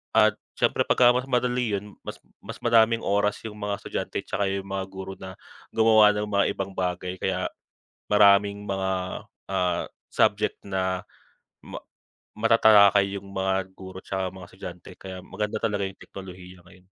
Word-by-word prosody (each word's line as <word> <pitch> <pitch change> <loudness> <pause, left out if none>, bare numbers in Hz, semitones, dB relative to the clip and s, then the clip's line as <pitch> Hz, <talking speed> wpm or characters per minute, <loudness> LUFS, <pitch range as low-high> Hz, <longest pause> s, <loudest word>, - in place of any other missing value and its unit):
at - - +6 0.2
siyempre - - +1
pagka 120 -1 +6
mas 125 +2 -1
madali 125 -3 0
’yon, 105 +1 -6
mas - - -7 0.2
mas 115 +3 -9
maraming 115 -1 +4
oras 100 +1 +1
’yong 110 - -6
mga 100 -1 -2
estudyante - - -4
tsaka 100 - -1
’yong 95 0 -2
mga 95 -1 -3
guro 95 0 -7
na, 95 0 -9 0.4
gumawa 110 -2 +6
ng 105 - -1
mga 100 0 +3
ibang 95 0 -4
bagay, 90 0 -2
kaya 95 -1 -1 0.7
maraming 100 0 +4
mga, 95 -1 -1 0.6
ah, 90 -2 0 0.3
subject - - +2
na 95 -2 -2 0.6
ma - - -9 0.6
matatalakay 100 -3 +5
’yong 100 - -10
mga 95 0 0 0.2
guro 95 0 -10
tsaka 95 -1 -2
mga 90 -2 -10
estudyante, 90 -2 -9
kaya 95 -1 -8
maganda 105 +1 -3
talaga 105 -3 0
’yong 95 - -10
teknolohiya 90 -1 -11
ngayon. 90 0 -19
100 Hz, 150 wpm, -25 LUFS, 95-105 Hz, 0.7 s, at